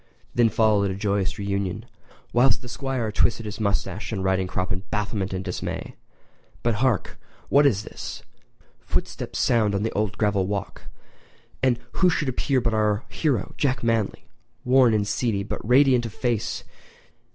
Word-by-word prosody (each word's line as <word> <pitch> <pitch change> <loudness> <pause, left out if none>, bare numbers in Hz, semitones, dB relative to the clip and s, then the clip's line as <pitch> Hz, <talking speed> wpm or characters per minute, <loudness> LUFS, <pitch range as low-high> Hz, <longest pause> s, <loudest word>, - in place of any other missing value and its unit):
Then 120 -1 +4
followed 105 -2 +3
a 95 - -3
joyous 100 -1 -1
reunion, 100 -2 -2 0.5
whilst 125 +2 +3
the - - -8
Squire 125 -3 -2
twisted 115 +1 +1
his 105 0 -6
moustache 100 0 -1
and 95 -4 -2
riding 95 0 +1
crop 95 0 -2
in 95 - -3
bafflement 105 -2 -2
and 95 0 -4
dismay. 90 - -4 0.7
But 120 - +2
hark! 130 -6 0 0.3
What 145 +1 +6
is 105 -6 +1
this? - - -7 0.6
Footsteps - - -3
sound 110 -4 +2
on 100 - 0
the 115 - -1
old 105 -1 -1
gravel 100 -3 +1
walk, 100 0 -4 0.8
and 130 -2 +3
who 185 - +3
should 150 -5 0
appear 130 +1 +1
but 115 -2 0
our 105 0 +1
hero, 135 - -1
Jack 130 -4 +1
Manly—worn 115 +2 +1
and 105 -1 +1
seedy, 105 -3 0
but 100 - -5
radiant 125 0 +4
of 110 - -10
face. 120 -3 -1
110 Hz, 155 wpm, -24 LUFS, 100-120 Hz, 0.8 s, What